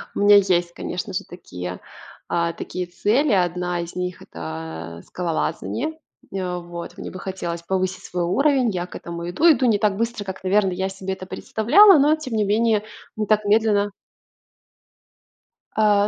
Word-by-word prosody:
У - - -2
меня 205 0 +8
есть, 175 -3 +2
конечно 185 +4 -5
же, 200 +2 -2
такие, 90 - -7 0.5
а, 170 -1 0
такие 180 +2 -5
цели. 235 +11 +1
Одна 180 -1 0
из 170 0 -8
них- 180 0 -4
это, 80 +1 -7
э, - - -21
скалолазание. 180 - -3 0.3
Э, 180 -2 -2
вот. 170 0 -8
Мне - - -7
бы 185 - -8
хотелось 175 -3 -4
повысить 185 +1 -1
свой 175 -1 -2
уровень. 265 - +2
Я 180 -3 -2
к - - -12
этому 170 0 -6
иду, 320 - +5
иду 260 -3 +2
не 225 -4 +4
так 205 -1 +1
быстро, 230 -1 -2
как, 190 -1 -7
наверно, 195 +1 +3
я 190 +1 -1
себе 190 0 -4
это 190 - -8
представляла, 310 - +5
но, 295 +3 +5
тем 300 -6 -7
не 215 -1 +2
менее, 215 +1 +2 0.3
не 215 - 0
так 215 0 +2
медленно 205 -1 +3 1.8
А, 205 -1 +4
190 Hz, 170 wpm, -22 LUFS, 175-215 Hz, 1.8 s, меня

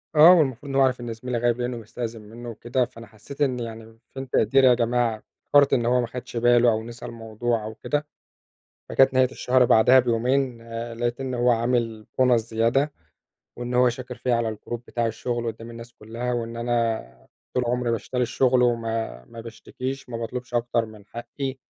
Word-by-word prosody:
آه، 160 +4 +9
والمفروض 140 -5 +1
إن 135 - -4
هو 135 - +4
عارف 130 -2 +3
إن 120 -1 -4
زميلي 125 +2 -4
غايب 120 0 +1
لإنه 120 0 -2
مستأذن 115 0 -6
منه 115 +3 -10
وكده، 120 +3 -1
فأنا 115 -2 -13
حسيت 110 +7 -12
إن 130 -3 +1
يعني 115 -1 -8 0.2
فين 135 -1 -7
تقديري 130 +4 +4
يا 125 - +7
جماعة؟ 120 -2 0 0.2
افتكرت 145 -1 +4
إن 120 -2 +2
هو 125 +1 +3
ما 120 - -2
خدش 125 0 -7
باله 120 0 +5
أو 110 0 -1
نسى 115 +1 -9
الموضوع 115 0 -3
أو 110 +1 -7
كده. 145 +5 -2 0.8
فكانت 135 0 +4
نهاية 130 0 +4
الشهر 125 0 +2
بعدها 120 +2 +6
بيومين، 125 +1 +1 0.3
لقيت 120 +2 -2
إن 130 -1 -3
هو 120 0 +2
عامل 115 -2 0 0.2
bonus 125 -1 +5
زيادة، 115 +6 +1 0.6
وإن 120 0 -4
هو 125 0 +5
شاكر 125 +1 -5
فيَّ 125 - -1
على 115 -2 0
الgroup 120 - -7
بتاع 120 -1 -1
الشغل 120 +1 -3
قدّام 115 +1 -6
الناس 115 0 -10
كلها، 115 +3 -5
وإن 115 -1 -3
أنا 115 - -2 0.3
طول 125 - +1
عمري 125 0 0
باشتري 125 +2 -2
الشغل 125 +1 +2
وما 115 - -1
ما 115 - -11
باشتكيش، 130 +4 -7
ما 120 - -5
باطلبش 120 +1 -6
أكتر 120 -1 +1
من 105 -2 -14
حقي. 135 +4 -6
120 Hz, 185 wpm, -24 LUFS, 115-125 Hz, 0.8 s, آه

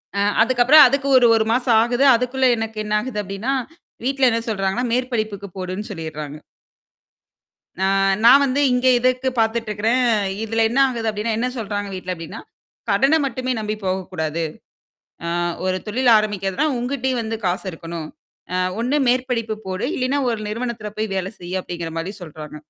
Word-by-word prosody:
அ - - 0 0.2
அதுக்கப்புறம் 255 +5 +7
அதுக்கு 275 +2 -1
1 245 - +6
1 220 -1 +2
மாசம் 245 -2 +3
ஆகுது. 245 +4 +2
அதுக்குள்ள 250 +2 0
எனக்கு 225 0 -5
என்ன 210 0 -3
ஆகுது 225 -1 -4
அப்டின்னா, 195 +7 -3 0.5
வீட்டுல 270 -1 +3
என்ன 230 0 0
சொல்றாங்கன்னா, 195 +3 -1
மேற்படிப்புக்கு 220 -5 -2
போடுன்னு 185 +3 -5
சொல்லிட்றாங்க. 155 -4 -6 1.4
அ 190 - -3 0.4
நான் 265 +4 +8
வந்து 270 +1 0
இங்கே 250 +1 +3
இதுக்கு 255 +1 +1
பார்த்துட்டு 225 0 0
இருக்றேன். 225 +5 +1 0.4
இதுல 225 +1 -1
என்ன 250 +4 0
ஆகுது 230 -3 -2
அப்டின்னா, 215 +1 -2
என்ன 245 +2 0
சொல்றாங்க 205 -2 -3
வீட்ல 185 -1 -4
அப்டின்னா, 165 -2 -8 0.5
"கடன 270 +11 +3
மட்டுமே 255 0 -3
நம்பி 215 0 -3
போகக் 185 0 -2
கூடாது. 160 -1 -2 0.8
அ - - -2 0.4
ஒரு 185 0 0
தொழில் 245 +4 +2
ஆரம்பிக்கறதுன்னா 205 +4 -1
உங்கிட்டேயும் 255 0 -1
வந்து 225 0 -3
காசு 180 +3 -1
இருக்கணும். 165 -1 -7 0.5
அ - - +1 0.2
ஒண்ணு 250 +5 0
மேற்படிப்பு 245 -3 0
போடு. 185 +1 -3
இல்லைனா 270 +2 0
ஒரு 225 -2 -2
நிறுவனத்ல 220 -1 -4 0.2
வேல 190 0 -2
செய்யி." 180 +1 -6
அப்டிங்கற 170 -2 -6
மாதிரி 180 +5 -4
சொல்றாங்க. 155 -2 -9
225 Hz, 155 wpm, -21 LUFS, 190-250 Hz, 1.4 s, நான்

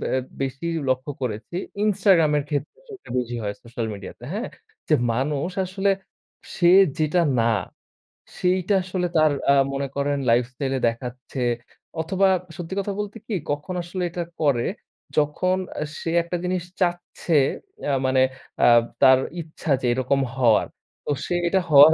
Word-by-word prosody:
ব্যা 130 0 -2
বেশি 135 +5 -3 0.2
লক্ষ্য 130 +2 0
করেছি 110 +6 -4 0.3
Instagram 190 -6 +4
এর 145 - -1
ক্ষেত্রে 155 - -3
সেটা 395 -3 -12
বেশি 120 -1 -2
হয় 100 0 -2
সোশ্যাল 115 -1 -4
মিডিয়াতে। 100 - -10
হ্যাঁ? - - -3 0.4
যে - - +5 0.2
মানুষ 140 +6 -1
আসলে 195 +2 0 0.6
সে 175 -1 +4 0.3
যেটা 155 +3 +2 0.2
না, 115 - +2 0.9
সেইটা 185 +2 +1
আসলে 185 -1 -1
তার 155 -1 +5 0.2
আ - - +7 0.2
মনে 140 0 -2
করেন 140 0 0
লাইফস্টাইলে 125 +3 +1
দেখাচ্ছে। 125 +3 -4 0.6
অথবা 190 +4 +2 0.3
সত্যি 175 +2 -6
কথা 200 0 -2
বলতে 210 +2 -4
কি? 225 - -3 0.2
কখন 145 +6 -3
আসলে 180 +2 -4
এটা 175 +1 -3 0.2
করে? 140 -6 +2 0.5
যখন 155 +5 +2 0.2
আ - - +1 0.2
সে 165 - -3
একটা 170 +1 -3
জিনিস 180 -1 -1 0.2
চাচ্ছে 175 -2 0 0.5
অ্যা 145 - 0
মানে 130 0 +3 0.4
অ্যা - - +5 0.3
তার 130 0 +7 0.2
ইচ্ছা 160 -1 -5
যে - - -2
এরকম 130 +2 +1 0.2
হওয়ার। 120 -5 +4 0.4
তো - - -1
সে - - -2 0.2
এটা 190 +2 +3
হওয়ার 150 +1 +9
150 Hz, 150 wpm, -24 LUFS, 130-180 Hz, 0.9 s, হওয়ার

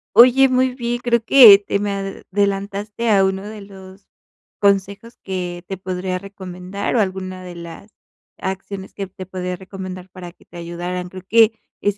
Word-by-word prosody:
Oye, 255 +4 +7
muy 255 0 +1
bien, 240 -1 -2
creo 235 -2 +1
que 230 -4 +9
te 200 0 -2
me 205 0 -2
adelantaste 200 +2 -2
a 200 -2 +5
uno 190 0 0
de 210 0 -8
los 195 -1 -13 0.5
consejos 200 +3 0
que 180 -2 -4
te 195 - -5
podría 185 0 -3
recomendar, 190 0 -5
o - - +4
alguna 185 -2 -3
de 180 -1 -9
las 170 +5 -10 0.5
acciones 190 0 -6
que 195 -1 -5
te 185 0 -10
podría 180 0 -4
recomendar 185 0 -8
para 180 -2 -10
que - - -24
te 175 - -13
ayudaran. 175 +1 -5
Creo 185 0 -10
que 225 0 +5 0.2
es 205 0 0
195 Hz, 165 wpm, -20 LUFS, 185-205 Hz, 0.5 s, que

